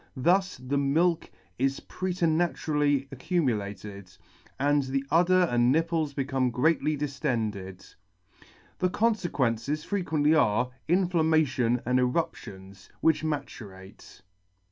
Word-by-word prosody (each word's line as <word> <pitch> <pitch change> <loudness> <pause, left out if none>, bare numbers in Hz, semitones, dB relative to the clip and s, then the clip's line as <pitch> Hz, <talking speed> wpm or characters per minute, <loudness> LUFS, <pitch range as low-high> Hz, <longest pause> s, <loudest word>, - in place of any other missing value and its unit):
Thus 185 +7 +2
the 130 +3 -2
milk 165 +5 +1 0.3
is 135 +1 0
preternaturally 160 -5 0
accumulated, 105 - -3 0.5
and 145 +1 +2
the 135 0 -2
udder 180 +3 +4
and 120 -6 +2
nipples 160 -1 0
become 135 -2 0
greatly 150 +4 +1
diftended. 115 - -4 0.9
The 185 - +1
confequences 150 - -1
frequently 160 -6 +1
are, 125 -4 +2 0.2
inflamma 165 -3 +3
tion 125 -3 0
and 125 +1 +2
eruptions, 100 - -3
which 160 -1 +3
maturate. 100 -13 -7
140 Hz, 100 wpm, -27 LUFS, 125-165 Hz, 0.9 s, udder